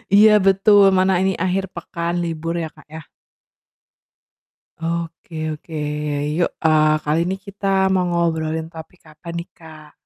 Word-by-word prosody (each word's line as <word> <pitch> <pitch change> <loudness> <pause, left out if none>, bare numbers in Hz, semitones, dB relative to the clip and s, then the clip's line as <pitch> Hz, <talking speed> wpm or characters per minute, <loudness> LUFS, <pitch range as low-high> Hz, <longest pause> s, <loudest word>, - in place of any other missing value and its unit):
Iya, 215 +1 +7
betul, 195 0 +5
mana 190 +1 +3
ini 190 0 +1
akhir 190 +1 0
pekan 170 0 -3
libur 165 0 -3
ya, 160 - -4
Kak, - - -20
ya? 160 - -7 1.8
Oke 165 -1 -4
oke. 155 +1 -9 0.6
Yuk, 175 - +2 0.2
eee, 155 -1 +4
kali 150 +2 +1
ini 190 - -1
kita 200 0 -5 0.3
mau 185 - +2
ngobrolin 160 -2 -1
topik 160 +3 -12
apa 155 +2 -18
nih, 170 +1 -5
Kak? 155 -2 -14
170 Hz, 135 wpm, -20 LUFS, 160-185 Hz, 1.8 s, Iya